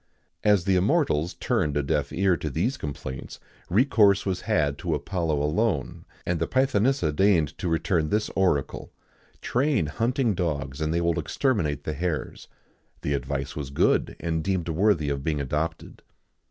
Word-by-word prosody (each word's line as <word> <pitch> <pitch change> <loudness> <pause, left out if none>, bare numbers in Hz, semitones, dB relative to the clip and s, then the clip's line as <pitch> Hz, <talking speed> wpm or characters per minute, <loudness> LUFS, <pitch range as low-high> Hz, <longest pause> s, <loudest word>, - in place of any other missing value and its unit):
As 100 -4 +3
the 95 - +3
immortals 90 - +1
turned 75 -1 0
a 75 - +1
deaf 70 0 -1
ear 95 0 +2
to 75 - -4
these 90 - 0
complaints, 65 - -7 0.3
recourse 105 -2 +4
was 95 -2 -1
had 75 -10 0
to 85 -3 -1
Apollo 80 0 -1
alone, 80 - -1 0.2
and 85 -1 -1
the 80 - 0
Pythonissa 130 - +2
deigned 85 -6 +3
to 90 - -2
return 80 -1 +1
this 105 +1 +1
oracle: 90 -8 0 0.5
"Train 135 - +1
hunting 115 - 0
dogs, 75 -6 -3
and 80 0 0
they 85 +1 +1
will 85 0 +1
exterminate 80 - 0
the 75 - -3
hares."[XIX 80 -2 -3
92] - - -37 0.5
The - - +1
advice 70 +1 -3
was 70 -3 -5
good, 70 - +1
and 80 -2 -2
deemed 90 -1 -1
worthy 85 -3 +2
of 70 -1 -2
being 75 -1 -1
adopted. 75 +4 -3
85 Hz, 160 wpm, -26 LUFS, 75-100 Hz, 0.5 s, recourse